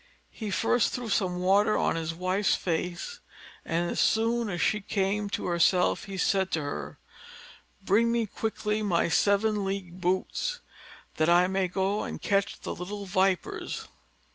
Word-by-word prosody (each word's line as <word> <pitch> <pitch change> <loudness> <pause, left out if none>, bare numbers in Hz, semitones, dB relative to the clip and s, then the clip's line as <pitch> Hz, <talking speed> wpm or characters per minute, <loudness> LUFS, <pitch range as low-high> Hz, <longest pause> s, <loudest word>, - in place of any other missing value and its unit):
He 215 -3 -6
first 225 +3 +2
threw 245 -2 -4
some 185 -3 +1
water 195 +4 +3
on - - +1
his 165 -1 -2
wife's 185 +3 +1
face; 175 - -3 0.4
and, 170 +1 -1
as - - -2
soon 230 0 +2
as 175 -3 -3
she 210 +6 +1
came 200 +1 -1
to - - -3
herself, 180 +1 +2
he 195 -2 -6
said 190 0 +1
to 160 - +1
her: 75 - -5 0.9
"Bring 225 +5 +3
me 235 -1 +1
quickly 215 0 -2
my 175 -5 +1
seven 205 +3 +2
league 190 -2 -4
boots, 185 - -1 0.6
that 155 +1 +2
I 175 +1 +6
may 190 0 0
go 195 +3 0
and - - -5
catch 200 -1 0
the - - -4
little 200 +3 -6
vipers." 195 - -1
195 Hz, 155 wpm, -28 LUFS, 180-210 Hz, 0.9 s, I